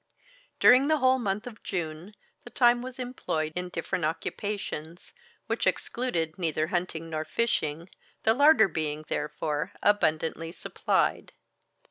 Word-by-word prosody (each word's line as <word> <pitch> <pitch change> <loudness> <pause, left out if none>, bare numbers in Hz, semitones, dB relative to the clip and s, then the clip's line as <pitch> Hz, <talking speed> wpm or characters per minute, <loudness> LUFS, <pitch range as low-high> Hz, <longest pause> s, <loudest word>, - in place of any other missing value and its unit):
During 255 +3 +7
the 310 0 +3
whole 260 -2 +4
of - - -5
the - - -5
month 195 +1 -1
of 235 -3 -9
June 170 +3 -5 0.3
the - - -10
time 240 0 +4
was 255 0 -7
employed 205 -11 -3
in 180 0 -3
different 170 0 -3
occupations, 165 0 -4 0.3
which - - -1
excluded 175 -9 -1
neither 155 -3 0
hunting 175 -2 -2
nor 155 -1 -2
fishing, 165 -6 -1 0.4
the 220 - +5
larder 285 -4 +6
being, 155 -3 -3
therefore, 150 0 -2
abundantly 165 -4 +1
supplied. - - -1
180 Hz, 135 wpm, -28 LUFS, 155-240 Hz, 0.4 s, During